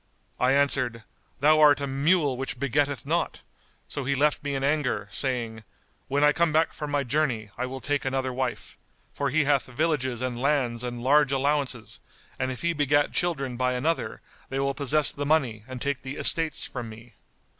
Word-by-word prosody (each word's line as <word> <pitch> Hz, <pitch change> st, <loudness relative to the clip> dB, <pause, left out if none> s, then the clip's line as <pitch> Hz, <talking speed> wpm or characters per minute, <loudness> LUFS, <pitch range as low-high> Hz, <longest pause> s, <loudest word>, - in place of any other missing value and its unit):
I 125 Hz, +1 st, +3 dB
answered, 130 Hz, -5 st, +1 dB, 0.4 s
'Thou 155 Hz, +2 st, +5 dB
art 145 Hz, -2 st, +6 dB
a 140 Hz, -, -2 dB
mule 140 Hz, +1 st, +2 dB
which 135 Hz, 0 st, -4 dB
begetteth 140 Hz, 0 st, 0 dB
not'; -, -, -1 dB, 0.5 s
so 140 Hz, -, -5 dB
he 140 Hz, +2 st, 0 dB
left 150 Hz, +2 st, +1 dB
me 145 Hz, -1 st, -2 dB
in 135 Hz, -, -2 dB
anger, 135 Hz, -8 st, 0 dB
saying, 115 Hz, -5 st, -1 dB, 0.4 s
'When 140 Hz, +2 st, +1 dB
I 150 Hz, -, +6 dB
come 170 Hz, 0 st, +2 dB
back 160 Hz, +2 st, +2 dB
from 150 Hz, -, -5 dB
my 145 Hz, -1 st, 0 dB
journey, 125 Hz, -6 st, -1 dB
I 125 Hz, +1 st, -3 dB
will 130 Hz, +1 st, -7 dB
take 145 Hz, -1 st, -1 dB
another 130 Hz, -1 st, -1 dB
wife,' 130 Hz, -1 st, -4 dB, 0.3 s
for 140 Hz, -1 st, -1 dB
he 150 Hz, +3 st, +2 dB
hath 140 Hz, -1 st, +2 dB
villages 130 Hz, -3 st, -1 dB
and 125 Hz, -1 st, -3 dB
lands 130 Hz, -4 st, +1 dB
and 120 Hz, -1 st, -5 dB
large 145 Hz, +1 st, +4 dB
allowances, 135 Hz, -3 st, -1 dB, 0.4 s
and 130 Hz, 0 st, -1 dB
if 130 Hz, -, -7 dB
he 170 Hz, 0 st, +1 dB
begat 145 Hz, -1 st, +2 dB
children 140 Hz, -8 st, -1 dB
by 125 Hz, 0 st, +1 dB
another, 155 Hz, +7 st, -1 dB, 0.3 s
they 135 Hz, -, -3 dB
will 140 Hz, 0 st, 0 dB
possess 145 Hz, +1 st, +2 dB
the 145 Hz, -, -4 dB
money 135 Hz, -8 st, +1 dB
and 130 Hz, -1 st, -7 dB
take 140 Hz, +1 st, -2 dB
the 135 Hz, +1 st, -6 dB
estates 160 Hz, -1 st, +1 dB
from 120 Hz, -3 st, -6 dB
me." 115 Hz, +2 st, -13 dB
135 Hz, 190 wpm, -26 LUFS, 125-145 Hz, 0.5 s, art